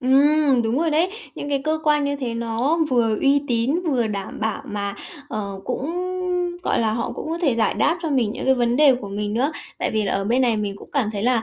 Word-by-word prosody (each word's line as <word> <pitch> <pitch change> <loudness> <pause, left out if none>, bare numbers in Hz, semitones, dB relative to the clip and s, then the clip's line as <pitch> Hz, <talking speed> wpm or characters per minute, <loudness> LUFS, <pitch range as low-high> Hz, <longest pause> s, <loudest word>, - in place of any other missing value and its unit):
Ừm, 275 0 +4
đúng 230 +5 0
rồi 330 0 +1
đấy, 320 +4 +3 0.3
những 290 - -5
cái 275 -1 0
cơ 315 0 +1
quan 295 -1 +3
như 285 0 -1
thế 245 -4 -3
nó 235 +7 0
vừa 230 -4 +2
uy 280 +1 +3
tín, 245 +8 +1
vừa 250 -7 +1
đảm 200 -1 -5
bảo 220 0 -2
mà, 200 -1 -3 0.3
ờ, 200 -3 -4
cũng, 275 +5 -3 0.7
gọi - - +1
là, 220 -1 +1
họ 235 +1 -2
cũng - - -6
có 335 - -2
thể 275 -7 +3
giải 225 -1 +1
đáp 335 - +2
cho 320 - -2
mình 240 -6 +1
những - - -5
cái 265 - +4
vấn 240 -1 +1
đề 285 -2 +6
của 240 -5 -6
mình 205 +1 -3
nữa. 275 +6 +1 0.3
Tại - - 0
vì 215 -1 +1
là 195 - -1
ở 195 0 0
bên 245 +5 +2
này 235 -3 +2
mình 205 -2 -3
cũng - - -13
cảm 240 -7 +1
thấy 205 - -3
là, 240 -1 +2
245 Hz, 250 wpm, -22 LUFS, 220-285 Hz, 0.7 s, đề